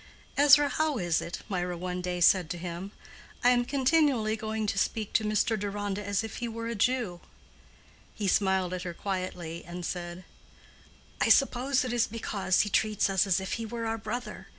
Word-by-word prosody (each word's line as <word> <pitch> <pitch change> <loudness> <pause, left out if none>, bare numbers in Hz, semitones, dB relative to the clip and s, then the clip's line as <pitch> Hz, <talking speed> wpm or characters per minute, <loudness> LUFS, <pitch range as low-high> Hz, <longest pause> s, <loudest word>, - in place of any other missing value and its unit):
"Ezra, 290 0 +7
how 310 -1 0
is 175 -5 +1
it?" 170 - -6
Mirah 180 -3 -2
one 180 +1 -4
day 180 0 -3
said 175 -1 +4
to 175 - -3
him—"I 180 +7 -3
am 245 -1 +3
continually 265 -4 +2
going 220 0 -3
to 200 -1 0
speak 215 0 -1
to 220 - +3
Mr. 215 +1 +1
Deronda 205 0 -3
as 200 +1 -1
if 225 - -6
he 240 - -3
were 230 0 -5
a 230 - -2
Jew?" 225 -5 0 0.9
He 205 - -2
smiled 190 -1 +2
at 185 - -3
her 175 -2 -5
quietly, 180 -4 -4
and 175 +1 -7
said, 175 +1 -5 1.0
"I - - +3
suppose 265 0 +3
it 245 - -3
is 240 -2 +2
because 205 -4 0
he 210 - -1
treats 210 -1 +2
us 190 +1 +2
as 190 -1 +3
if 190 - -4
he - - -3
were 230 +1 -4
our 225 0 -2
brother. 215 -3 -5
205 Hz, 185 wpm, -29 LUFS, 180-230 Hz, 1.0 s, Ezra